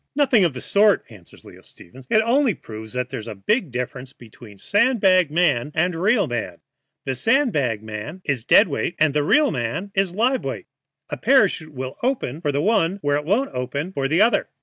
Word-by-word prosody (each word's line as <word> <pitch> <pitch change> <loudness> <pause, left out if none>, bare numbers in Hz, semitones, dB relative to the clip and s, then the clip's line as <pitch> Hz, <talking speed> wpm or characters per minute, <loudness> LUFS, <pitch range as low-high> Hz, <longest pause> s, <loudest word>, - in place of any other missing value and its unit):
"Nothing 270 -8 +3
of 170 -5 +1
the 125 - -6
sort," 205 0 +3
answers 95 -6 -16
Leo - - -14
Stevens; 125 +8 -16
"it 220 0 +3
only 245 - +2
proves 110 -2 -10
that 125 0 -3
there 130 - -5
is 110 - -10
a 110 - -6
big 190 - -1
difference 125 +1 -6
between 110 -2 -15
a - - -22
sand 230 - +1
bag 185 -4 +4
man 150 -5 +1
and 175 +3 +1
a 165 - -6
real 205 +3 +2
man. 115 - -4 0.5
The 135 - -1
sand 245 - +2
bag 115 -7 -2 0.4
is 135 -6 -1
dead 200 - +5
weight, 155 +2 -3
and 155 -2 +2
the 210 - +2
man 125 - -4
is 190 -2 0
live 250 +5 +1
weight. - - -5 0.5
A - - -3
parachute 200 - +2
will 130 0 -6
open 235 - -2
for 150 -4 -1
the 145 +1 -1
one 195 -4 +1
where 145 0 +1
it 150 - -5
won't 225 - 0
open 140 +8 -4
for 135 -5 -1
the 165 +8 +3
other." 235 - +1
155 Hz, 210 wpm, -21 LUFS, 125-210 Hz, 0.5 s, dead